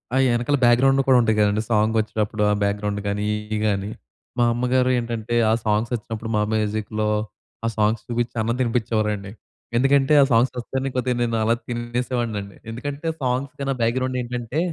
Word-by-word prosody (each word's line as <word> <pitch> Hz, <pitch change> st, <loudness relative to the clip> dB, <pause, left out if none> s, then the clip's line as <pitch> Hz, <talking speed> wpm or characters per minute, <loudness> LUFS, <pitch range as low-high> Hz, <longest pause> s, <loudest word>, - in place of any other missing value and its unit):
ఆ -, -, +3 dB, 0.2 s
ఎనకాల 130 Hz, +4 st, +1 dB
బ్యాక్‌గ్రౌండ్‌లో 135 Hz, +3 st, +4 dB
కూడా 130 Hz, -1 st, +6 dB
ఉంటాయి 110 Hz, -1 st, +1 dB
కదండీ! 105 Hz, 0 st, +2 dB
సాంగొచ్చేటప్పుడు 110 Hz, -1 st, +1 dB
ఆ -, -, +3 dB
బ్యాక్‌గ్రౌండ్ 105 Hz, 0 st, -1 dB
గానీ 100 Hz, +1 st, -1 dB
ఇయ్యి 105 Hz, 0 st, -4 dB
గానీ. 100 Hz, 0 st, -1 dB, 0.5 s
మా -, -, +5 dB
అమ్మగారు 125 Hz, +1 st, +1 dB
ఏంటంటే 115 Hz, -1 st, -3 dB, 0.2 s
ఆ -, -, +4 dB
సాంగ్సొచ్చినప్పుడు 110 Hz, +1 st, -2 dB
మా -, -, +2 dB
మ్యూజిక్‌లో 110 Hz, 0 st, -1 dB, 0.6 s
ఆ -, -, +2 dB
సాంగ్స్ 105 Hz, 0 st, +1 dB
చూపించి 120 Hz, 0 st, -2 dB
అన్నం 115 Hz, +2 st, 0 dB
తినిపించేవారండి 110 Hz, -4 st, -1 dB, 0.5 s
ఎందుకంటే 135 Hz, +3 st, +3 dB
ఆ -, -, +4 dB
సాంగ్సొస్తేనే 125 Hz, +3 st, +1 dB
కొద్దిగా 125 Hz, 0 st, 0 dB
నేను 115 Hz, -1 st, 0 dB
అలా 115 Hz, +1 st, +3 dB
తినేసేవాడినండి 120 Hz, -4 st, -3 dB
ఎందుకంటే 145 Hz, +6 st, -5 dB
సాంగ్స్‌కన్నా 135 Hz, +2 st, -1 dB
బ్యాక్‌గ్రౌండేంటంటే 125 Hz, +2 st, -1 dB
115 Hz, 140 wpm, -23 LUFS, 105-125 Hz, 0.6 s, కూడా